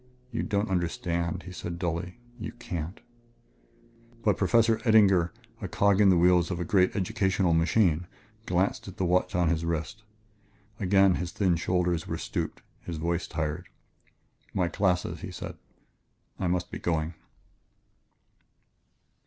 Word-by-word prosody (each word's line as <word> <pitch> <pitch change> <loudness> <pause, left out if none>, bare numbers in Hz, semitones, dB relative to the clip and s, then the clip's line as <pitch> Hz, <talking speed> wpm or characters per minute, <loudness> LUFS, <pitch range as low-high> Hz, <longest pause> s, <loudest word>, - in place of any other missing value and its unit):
"You 115 - -2
don't 100 +1 0
understand," 85 -1 -1
he 90 - -9
said 85 -1 -5
dully; 90 +2 -3 0.2
"you 110 +2 -5
can't 90 -5 -5 0.6
" 115 - -29
But 105 - +4
Professor 115 +3 +3
Eddinger, 100 -7 +5 0.3
a 95 - -3
cog 100 +2 +3
in 100 - +6
the 90 - +5
wheels 90 0 +4
of 90 -2 -3
a 90 - -2
great 95 +2 +3
educational 95 -2 +1
machine, 85 0 +2 0.4
glanced 90 +3 0
at 95 - -9
the 95 - 0
watch 90 +1 +1
on 90 -2 +3
his 80 -1 0
wrist. 85 +6 -3 0.8
Again 95 -1 +4
his 90 0 -4
thin 95 -4 +2
shoulders 85 0 0
were - - -3
stooped, - - -4 0.2
his 85 -2 -6
voice 85 +2 -1
tired. 80 +2 -3 0.9
"My 90 -3 +2
classes," 90 0 0
he - - -6
said. - - -7 0.8
"I 95 - 0
must 90 0 -1
be - - -5
going...." 80 -1 -1
90 Hz, 145 wpm, -28 LUFS, 85-100 Hz, 0.9 s, in